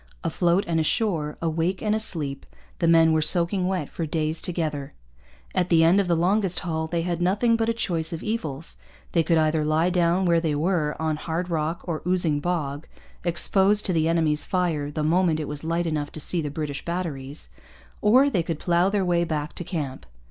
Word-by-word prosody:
Afloat 170 +3 +1
and 165 -1 0
ashore, 160 -2 0
awake 165 +3 -1
and 210 -1 +1
asleep, 160 -10 -3 0.3
the 170 - +1
men 165 -1 +5
were 160 - +2
soaking 180 +3 +4
wet 185 -6 -2
for 165 - -5
days 155 +1 -1
together. 155 -5 -3 0.6
At 180 -1 0
the 165 -2 +5
end 175 +5 +5
of 195 - -3
the 170 - +2
longest 185 +1 +1
haul 160 -3 -2
they 165 0 -2
had 175 0 -2
nothing 205 +6 +2
but 225 0 0
a - - +4
choice 170 -8 -1
of 165 - -5
evils. 165 -9 -4 0.3
They 170 - +3
could 165 0 +2
either 155 0 +2
lie 155 +4 +1
down 175 +1 +2
where 170 -1 +3
they 160 -3 -1
were, 155 -1 0
on 160 -1 -1
hard 170 +3 -4
rock 160 +1 -2
or 165 -3 -3
oozing 175 -5 +1
bog, 150 -3 -3 0.4
exposed 190 +4 +4
to 185 - +1
the 160 -1 +1
enemy's 160 -3 +1
fire 165 -6 -1
the 150 +1 -3
moment 165 0 +2
it 150 - -4
was 150 0 -6
light 170 +2 -1
enough 150 -3 -2
to - - -7
see 170 +2 +1
the 150 - -3
British 145 -1 -4
batteries, 155 -5 -5 0.5
or 250 +7 +5
they 195 -11 +1
could 165 -1 -3
plough 175 +3 +2
their 200 -2 0
way 175 -1 +2
back 150 -3 -3
to - - -6
camp. 150 -7 -5
165 Hz, 200 wpm, -24 LUFS, 155-180 Hz, 0.6 s, men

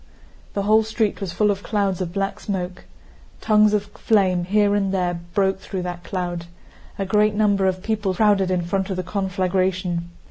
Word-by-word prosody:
The 200 - 0
whole 215 +2 +5
street 220 -1 -1
was 190 -3 -3
full 210 +2 +2
of 200 0 -3
clouds 200 -4 -1
of 175 -2 -3
black 195 +1 -2
smoke. 185 -3 -4 0.5
Tongues 215 -1 +4
of 210 -1 +1
flame 195 -4 +1
here 205 +2 +3
and 200 -2 +1
there 180 -2 0 0.2
broke 195 -1 +2
through 190 -1 -5
that 175 -1 -5
cloud. 175 -3 -4 0.5
A 195 - -2
great 210 +2 +2
number 205 -2 +2
of 185 0 -1
people 210 -4 -1
crowded 200 -2 +3
in 180 -2 0
front 190 +3 -1
of 190 - -2
the 185 - -2
conflagration. 185 -2 -1
195 Hz, 180 wpm, -22 LUFS, 185-205 Hz, 0.5 s, whole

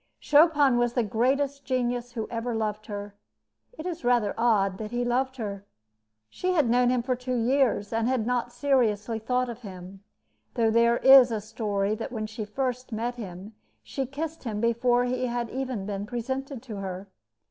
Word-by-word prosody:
Chopin 295 -4 +4
was 240 -1 +1
the 245 - +1
greatest 270 +6 0
genius 245 -2 -1
who 225 -3 -3
ever 235 0 -2
loved 215 -1 -3
her. 205 -1 -6 0.6
It 315 - -7
is 345 -2 -4
rather 240 -4 +2
odd 205 -5 +2
that 215 -1 -5
he 240 +1 -1
loved 260 +2 0
her. 200 -4 -5 0.6
She 365 - -2
had 305 -8 +3
known 245 0 +4
him 250 -1 +1
for 255 +1 0
two 250 +1 -3
years, 240 -3 +1
and 225 0 +1
had 250 -4 0
not 245 0 -1
seriously 240 -4 +1
thought 250 +3 0
of 235 0 -7
him, 190 -1 -10 0.5
though 225 -1 +2
there 235 +1 +4
is 265 -1 +8
a 225 -2 -1
story 205 -1 -2
that 225 +4 -5
when 220 -3 -3
she 215 0 -6
first 250 +3 -3
met 230 +2 -2
him 200 -3 -8 0.3
she 270 -2 -4
kissed 310 +4 -5
him 220 -4 -3
before 240 +2 +2
he 255 0 -1
had 240 -1 -3
even 255 -6 -3
been 200 0 -4
presented 260 +2 -4
to 225 -5 -7
her. 190 0 -5
240 Hz, 180 wpm, -27 LUFS, 215-255 Hz, 0.6 s, is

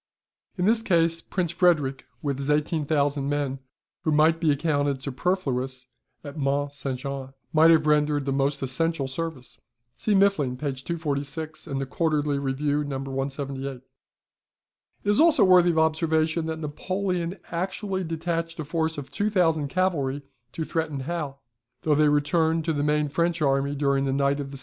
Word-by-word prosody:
In 180 - +1
this 225 +2 +4
case 165 -5 +2
Prince 180 -4 -2
Frederick 150 -7 +2 0.2
with 140 -2 -1
his 140 +1 -3
18,000 145 -2 +1
men 145 -2 -1 0.4
(who 160 - +1
might 160 +2 +4
be 160 -3 +4
accounted 145 -2 0
superfluous 130 -2 -2 0.4
at 145 -1 -8
Mont 140 +1 0
St. 135 -2 -4
Jean), 135 0 -6 0.2
might 160 +1 +6
have 160 -2 +5
rendered 150 -1 +2
the 140 - -1
most 140 +1 0
essential 145 +2 -1
service." 145 -2 -6 0.4
See 210 - +1
Muffling, 190 -11 +2
p. 140 0 -2
246 155 +1 -4
and 135 - -3
the 135 - -2
QUARTERLY 150 0 0
REVIEW, 145 +2 0
No. 140 -2 -3
178. 135 -1 -4 1.2
It - - -9
is 205 - +3
also 315 -7 +6
worthy 180 -1 +6
of 165 - 0
observation 160 0 +1
that 160 0 -3
Napoleon 180 +3 -2
actually 190 +2 -2
detached 165 0 -3
a 155 - -3
force 160 +1 -1
of 140 -2 -7
2,000 165 -5 +1
cavalry 145 -5 0 0.3
to 160 - -3
threaten 155 -3 -2
Hal, 140 -2 -4 0.4
though 155 - +3
they 150 0 +4
returned 160 +2 +2
to 160 - +1
the 145 - -1
main 150 0 +1
French 170 +3 0
army 140 -1 +1
during 140 -1 +1
the 135 - 0
night 140 +1 +1
of 140 -1 -4
the 140 - -8
17th. - - -4
150 Hz, 165 wpm, -25 LUFS, 140-165 Hz, 1.2 s, might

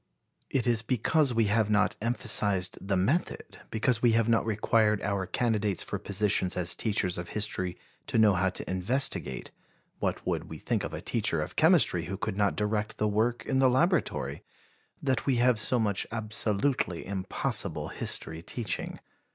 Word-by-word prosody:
It 130 -4 0
is 120 -2 +2
because 130 +5 +1
we 115 -2 +2
have 105 +1 +1
not 105 0 +2
emphasized 100 -5 +1
the 95 0 -1
method, 125 - -1
because 115 +1 0
we 120 -2 +4
have 115 0 +2
not 115 -1 +2
required 105 0 +2
our 100 -2 -1
candidates 105 -2 0
for - - -4
positions 100 -2 +1
as 85 -1 +1
teachers 100 -5 0
of 85 - -7
history 95 -4 -2 0.3
to - - -1
know 110 -2 +5
how 95 +1 +1
to 90 - -5
investigate 95 - -1 0.5
what - - -2
would - - -2
we - - -7
think - - -2
of - - -4
a - - -6
teacher - - 0
of - - -4
chemistry - - +4
who 95 +4 -4
could 95 - -3
not 100 -1 +1
direct 105 +1 -2
the 105 - +1
work 110 +4 0
in 130 - 0
the 130 -1 +5
laboratory! 130 - 0 0.6
that 130 -1 0
we 135 - +3
have 120 -1 +3
so 125 +4 +1
much 105 -4 0
absolutely 110 -2 0
impossible 95 -2 -2
history 80 0 -3
teaching. 115 +6 -4
105 Hz, 165 wpm, -28 LUFS, 95-120 Hz, 0.6 s, know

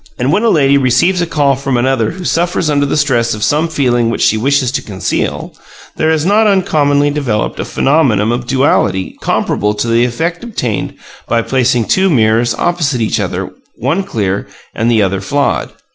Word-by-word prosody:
And 130 +4 0
when 200 - +2
a 230 - +2
lady 140 -6 +3
receives 165 +9 +2
a 175 - -1
call 145 -4 +1
from 135 -1 -2
another 120 -3 +1
who 185 - -8
suffers 170 -2 0
under 145 -1 +1
the 140 - -1
stress 120 -6 +1
of 105 - -5
some 155 +3 +1
feeling 125 -7 0
which 115 - -1
she - - +3
wishes 130 +2 +1
to 135 - -2
conceal, 95 -3 -3 0.4
there 160 - 0
is 160 -1 +1
not 210 +3 +3
uncommonly 145 -7 +2
developed 130 -8 -2
a - - -2
phenomenon 130 -8 +1
of 120 0 -3
duality 130 -8 +1
comparable 105 +1 -1
to 105 +3 -2
the 115 +1 +2
effect 165 - -2
obtained 125 - -3 0.3
by 115 -1 +1
placing 125 -2 +1
two 190 - +2
mirrors 115 -4 +2
opposite 160 -7 -1
each 110 - 0
other, - - -3 0.2
one 145 - -1
clear 100 - -3 0.3
and 115 +2 0
the 110 -3 +3
other 95 0 -1
flawed. 140 +8 -1
135 Hz, 185 wpm, -13 LUFS, 115-155 Hz, 0.4 s, lady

